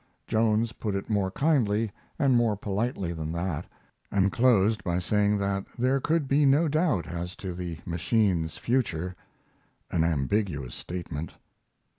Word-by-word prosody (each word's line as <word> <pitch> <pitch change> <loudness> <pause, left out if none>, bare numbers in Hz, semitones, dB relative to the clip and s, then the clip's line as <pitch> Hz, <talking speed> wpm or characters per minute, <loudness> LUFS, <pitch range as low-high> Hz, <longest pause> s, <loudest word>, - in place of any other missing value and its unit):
Jones 110 +1 +2
put 105 -3 -3
it 100 +2 -4
more 100 -3 +1
kindly 115 -5 +1 0.3
and 135 -3 +3
more 115 -4 +3
politely 100 -3 -2
than 80 -1 -4
that, 85 -1 -3 0.4
and 100 0 +3
closed 110 -3 +3
by 85 -1 0
saying 105 +3 +2
that 100 -1 -1
there 130 +3 +2
could 155 +1 +1
be 140 +2 +3
no 145 +4 +4
doubt 155 - +1
as 90 +1 -5
to 95 -2 -5
the 85 -2 -5
machine's 85 -1 +1
future 95 -8 -1 0.8
an 80 - +2
ambiguous 80 - 0
statement. 85 -3 -6
100 Hz, 140 wpm, -27 LUFS, 85-115 Hz, 0.8 s, no